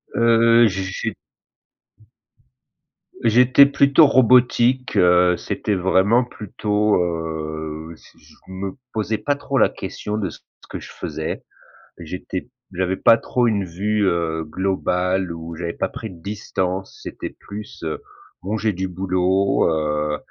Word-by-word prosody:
Heu, 115 0 +5
j'ai 95 -1 -3 2.1
j'étais 125 +4 +6
plutôt 140 +2 +5
robotique, 125 0 +3
heu, 90 0 +4
c'était 105 - -2
vraiment 95 +6 +3
plutôt, 105 -1 -1
heu, 80 -1 -4
je - - -21
je - - -20
me 95 +1 -6 0.2
posais 110 0 -1
pas 145 - 0
trop 140 -1 -3
la - - +5
question 105 0 -5
de 100 -4 -2
ce 80 - -12 0.3
que - - -6
je - - -11
faisais. - - -5 0.6
J'étais 90 +5 -6 0.2
j'avais 95 +1 -1
pas 115 - +6
trop 120 +1 0
une 105 -3 +1
vue, 100 +4 -1
heu, 80 -2 -1
globale 95 +1 -1
où 85 0 -8
j'avais 85 0 -4
pas - - -2
pris 110 - -7
de 85 -4 -13
distance, 95 -2 -4
c'était - - -6
plus, 105 -2 -9
heu, 80 -1 -4 0.4
bon 100 +6 -2
j'ai 110 0 0
du 95 +1 -3
boulot, 95 +1 +1
heu, 75 -1 -1
95 Hz, 135 wpm, -21 LUFS, 85-110 Hz, 2.1 s, j'étais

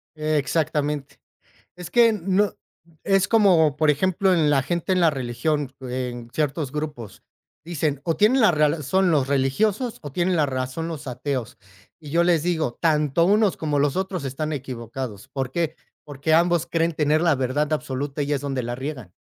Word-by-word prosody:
Exactamente, 150 -1 -1 0.6
es 180 -1 -8
que 235 0 +5
no, 195 0 0 0.5
es 195 -2 +2
como, 175 - +4
por 155 -1 +3
ejemplo, 185 +5 +1
en 160 -4 +3
la 140 -3 +3
gente 175 +3 -2
en 185 - +2
la 165 -2 +5
religión, 135 +2 -2
en 125 -2 -5
ciertos 150 0 -2
grupos 150 -9 -6 0.4
dicen: 155 -4 -2
"O 165 - 0
tienen 225 +6 +4
la 220 - +6
razón 155 +3 +2
los 140 -4 +2
religiosos 200 - 0
o 145 -3 -8
tienen 180 +2 +1
la 150 - +3
razón 130 +4 -3
los 155 -4 -7
ateos", 125 -1 -4 0.4
y 150 - -11
yo 170 +2 +3
les 170 -3 +3
digo: 160 -8 -1
"Tanto 155 0 +2
unos, 205 0 +3
como 150 -2 -1
los 140 +1 +1
otros 190 -5 -2
están 155 +4 -3
equivocados", 125 -3 -6
¿por 135 -2 -4
qué? 165 0 -1 0.3
Porque 145 +2 -3
ambos 170 0 +3
creen 165 0 +1
tener 150 0 +2
la 170 -2 +3
verdad 135 +3 -1
absoluta 140 0 -3
y 145 - -2
es 140 - 0
donde 135 -3 -3
la 120 +1 -4
riegan. 130 - -6
150 Hz, 170 wpm, -23 LUFS, 135-170 Hz, 0.6 s, la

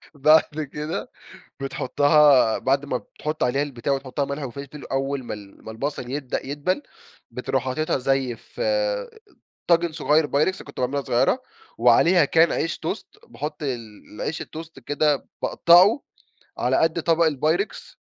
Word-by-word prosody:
بعد 155 +1 +4
كده 150 +2 -4 0.5
بتحطها 140 -2 +4
بعد 135 +2 0
ما 130 -3 -1
بتحط 150 +7 -5
عليها 130 +3 +1
البتاع 140 -1 -2
وتحط 135 +1 -5
لها 140 - +1
ملح 140 -2 -4 0.4
أول 135 0 -1
ما - - -5
ال 100 -2 -12
ما 110 - -6
البصل 125 +1 -4
يبدأ 135 -2 -3
يدبل، 145 - -1 0.5
بتروح - - -2
حاطيتها 150 +3 -1
زي 135 -2 0
في 300 - -11 1.1
طاجن 170 -1 +3
صغير 155 -1 +2
pyrex 170 +7 0
كنت 140 - -11
باعملها 135 +3 0
صغيرة، 185 - +2 0.4
وعليها 175 -3 +5
كان 165 +3 +4
عيش 165 - -2
toast - - -7
باحط 150 +6 -6
ال 115 -7 -6
العيش 160 - -3
الtoast 160 -3 -10
كده 145 -1 +1
باقطعه 185 - +5 0.6
على - - +1
قد 160 0 +1
طبق 165 0 +3
الpyrex، 155 +8 -2
145 Hz, 140 wpm, -23 LUFS, 130-160 Hz, 1.1 s, وعليها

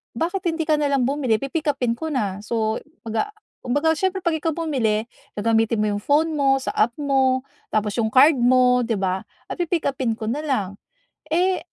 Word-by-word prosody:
"Bakit 360 +4 -2
hindi 325 - -2
ka 310 -1 +2
na 295 - +1
lang 275 -3 +2
bumili, 270 -5 +1
pi-pick-upin 275 -5 -1
ko 320 - -4
na." 205 -7 -1
So 220 -1 -1 0.2
kumbaga 225 - -2 0.3
kumbaga 290 +6 +1
siyempre 380 +2 -1
'pag 325 -2 +1
ikaw 320 0 -1
bumili, 235 -10 0 0.3
gagamitin 225 +1 +1
mo - - +2
'yong 205 - -2
phone 310 +3 +2
mo, 270 -1 +3
sa - - -3
app 235 +2 +2
mo, 265 -2 +2 0.3
tapos 210 -1 +1
'yong 220 -2 +1
card 275 +2 +6
mo, 250 0 +4
'di 230 -1 0
ba? 190 0 -1 0.3
Pi-pick-upin 280 -9 -1
ko 220 -1 -4
na 265 +6 -1
lang. 255 -10 0 0.6
Eh, 365 +3 +1
260 Hz, 180 wpm, -22 LUFS, 225-310 Hz, 0.6 s, card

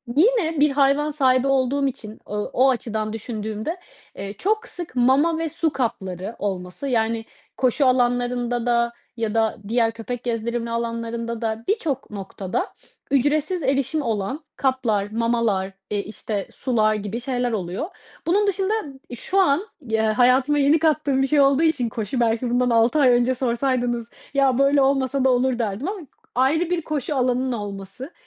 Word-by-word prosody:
yine 330 - +3
bir 295 0 +4
hayvan 280 +2 +2
sahibi 260 -3 +2
olduğum 275 +1 +2
için, 220 -4 -7
ııı, 210 0 -2
o 265 +2 +4
açıdan 220 -3 -2
düşündüğümde, 220 - -4 0.4
eee, 200 0 -6
çok 430 - -1
sık 345 - -7
mama 270 +7 +3
ve 325 -1 -2
su 320 +2 0
kapları 205 - -3
olması, 190 +5 -4
yani, 225 -2 0 0.3
koşu 260 +2 +2
alanlarında 245 -1 +1
da 235 -1 +2 0.2
ya 225 -2 -1
da 225 -1 +1
diğer 230 0 +2
köpek 235 +2 -6
gezdirilme 235 0 -2
alanlarında 230 0 -3
da 225 0 -2
birçok 310 - -1
noktada 195 - -4 0.4
ücretsiz 295 +5 +1
erişim 275 +3 +1
olan 230 +4 -2
kaplar, 225 -7 0
mamalar, 230 -4 0 0.2
eee, 205 - -1
işte, 210 -1 -4
sular 220 -4 +1
gibi 210 +3 -4
şeyler 245 -1 -1
oluyor. 190 - -3 0.4
Bunun 410 +4 +3
dışında 390 +1 0 0.4
ıb - - -4
şu 375 +11 -1
an 360 +2 +3 0.2
y 220 - +1
eee, - - +3
hayatıma 255 +6 +3
yeni 290 +3 +4
kattığım 305 -4 +2
bir 270 - +2
şey 295 0 +4
olduğu 275 +3 +4
için 285 -7 +2
koşu, 225 +3 -3
belki 235 +1 +1
bundan 245 +1 +2
6 235 +5 +3
ay 270 -3 +6
önce 245 +1 +3
sorsaydınız: 245 -1 0 0.3
"Ya, 270 -3 +3
böyle 275 +1 +4
olmasa 270 0 +2
da - - +5
olur." 250 0 +2
derdim 220 - -2
ama 405 -2 -5 0.3
ayrı 300 +7 +2
bir 355 -1 0
koşu 300 -2 -3
alanının 255 0 +1
olması 205 - -6
250 Hz, 160 wpm, -23 LUFS, 225-280 Hz, 0.4 s, ay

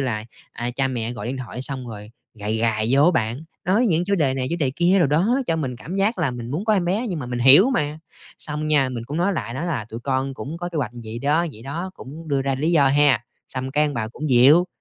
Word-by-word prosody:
là, 110 -5 -2 0.3
à, 120 +1 -3
cha 135 +2 0
mẹ 120 -2 -3
gọi 105 -3 -6
điện 130 +2 -3
thoại 125 0 -6
xong 130 -2 -3
rồi 105 -1 -9 0.2
gài 105 +1 -3
gài 110 -1 +1
vô 140 +2 +5
á 175 - +6
bạn, 125 0 -1 0.2
nói 210 +7 +3
những 170 -2 +2
chủ 200 - +1
đề 145 -8 +1
này, 130 -1 -2
chủ 170 - 0
đề 140 -5 +1
kia 180 +3 +4
đồ 165 - +4
đó 195 - +2
cho 165 - +1
mình 130 -6 -3
cảm 170 +10 -6
giác 200 +2 +1
là 155 -7 +1
mình 120 -1 -6
muốn 160 +9 -2
có 220 - +2
em 190 -4 +2
bé, 205 +8 0
nhưng 175 -5 -3
mà 125 - -5
mình 125 0 -3
hiểu 140 - +7
mà. 155 - -1 0.4
Xong 150 0 -2
nha, 145 -4 +3
mình 120 -3 -5
cũng 145 +5 -5
nói 180 +4 +1
lại, 125 -9 -4
nói 160 +6 -3
là 135 -11 -2
tụi 115 +1 -7
con 135 +1 -1
cũng 155 +6 -6
có 175 +1 -4
kế 170 - -7
hoạch 125 -7 -1
vậy 110 +2 -6
đó, 150 +6 +1
vậy 110 - -13
đó, 165 +8 -5
cũng 155 +4 -10
đưa 140 -2 +1
ra 135 0 0
lý 155 +6 0
do 140 -4 +5
ha, 140 -3 +3 0.2
xong 130 0 -4
cái 150 +2 +2
ông 145 - -2
bà 110 -2 -2
cũng 150 +5 -5
dịu. 140 +9 +6
140 Hz, 280 wpm, -22 LUFS, 125-170 Hz, 0.4 s, hiểu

